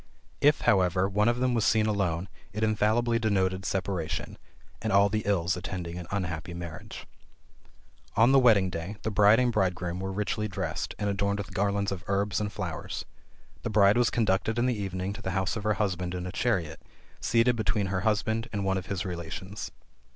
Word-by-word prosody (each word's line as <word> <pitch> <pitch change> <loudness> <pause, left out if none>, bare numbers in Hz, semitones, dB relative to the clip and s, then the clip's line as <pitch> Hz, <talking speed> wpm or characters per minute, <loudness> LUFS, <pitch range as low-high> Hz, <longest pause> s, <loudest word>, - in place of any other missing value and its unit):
If, 145 +1 +4
however, 95 -1 +3
one 105 +3 +2
of 120 - +1
them 130 0 +1
was 115 -3 +1
seen 110 -1 +3
alone 95 -4 0 0.3
it 110 +1 -2
infallibly 110 +2 +2
denoted 95 -3 0
separation, 90 -5 -3 0.4
and 110 - -1
all 100 +1 +5
the 110 +1 0
ills 90 -3 +1
attending 90 -1 -5
an 85 - -8
unhappy 85 -3 -3
marriage. 85 -2 -8 1.1
On 115 +4 +5
the 135 - +7
wedding 105 -7 +4
day, 85 +5 -5
the 110 - -1
bride 105 +2 +6
and 125 -1 +2
bridegroom 90 -4 -1
were 95 0 -3
richly 105 +2 -1
dressed, 95 -5 -4
and 105 - -2
adorned 100 0 0
with 100 - -6
garlands 100 0 0
of 95 -2 -5
herbs 100 0 0
and 105 -1 -2
flowers. 90 -6 -5 0.6
The - - -3
bride 100 -1 +5
was 120 0 +3
conducted 110 0 +1
in 120 - +2
the 125 - +2
evening 95 0 -3
to - - -9
the 95 - -3
house 95 -1 0
of 105 -2 -5
her 105 -1 +2
husband 90 -3 -1
in 90 0 -4
a 90 - -4
chariot, 85 -9 -1 0.4
seated 120 +1 +3
between 110 -2 0
her 95 -1 -1
husband 110 +2 0
and 100 -2 -2
one 95 0 +1
of 95 - -10
his 95 -2 -3
relations. 90 +3 -5
100 Hz, 190 wpm, -28 LUFS, 90-110 Hz, 1.1 s, the